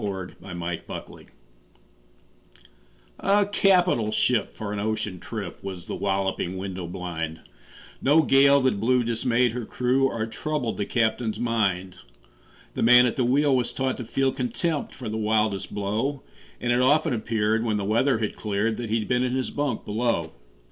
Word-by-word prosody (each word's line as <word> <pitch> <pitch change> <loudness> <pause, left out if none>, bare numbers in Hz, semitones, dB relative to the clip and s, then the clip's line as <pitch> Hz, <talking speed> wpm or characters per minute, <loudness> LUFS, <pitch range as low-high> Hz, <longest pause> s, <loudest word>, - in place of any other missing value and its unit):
Y - - -1
Z 95 -2 -6
A 90 -2 -8
Nautical 85 0 -5
Ballad - - -15 1.9
A 200 +1 +3
CAPITAL 180 - +3
ship 120 0 +1
for 105 -1 -5
an 105 - -3
ocean 110 -3 -2
trip 100 -4 -7
Was 95 -3 -6
The - - -5
Walloping 95 -2 -1
Window 95 -2 -5
blind 85 -3 -5 0.6
No 150 +4 +5
gale 140 0 +5
that 130 -6 +1
blew 125 +3 +2
dismayed 120 +1 +1
her 120 +1 -4
crew 125 +4 +1
Or 115 -4 -2
troubled 130 +1 -3
the 100 - -2
captain's 110 -2 0
mind. 95 -6 0 0.8
The - - -3
man 125 +2 +7
at 120 - 0
the 130 - +1
wheel 135 +3 +3
was 120 -2 0
taught 130 +1 -1
to 125 - -5
feel 135 +4 0
Contempt 145 +5 -2
for 125 - -7
the 110 +1 -3
wildest 105 -2 0
blow, 110 +8 -2 0.4
And 120 - 0
it 120 +1 +3
often 150 +3 +3
appeared, 110 -1 0
when 110 -3 0
the 100 - -2
weather 115 +5 +2
had 110 -2 -3
cleared, 105 +1 -1
That 120 -2 -5
he'd 110 -1 0
been 125 -1 +1
in 125 0 0
his 130 -1 -2
bunk 145 -2 -2
below. 105 -7 -1
115 Hz, 170 wpm, -25 LUFS, 100-130 Hz, 1.9 s, man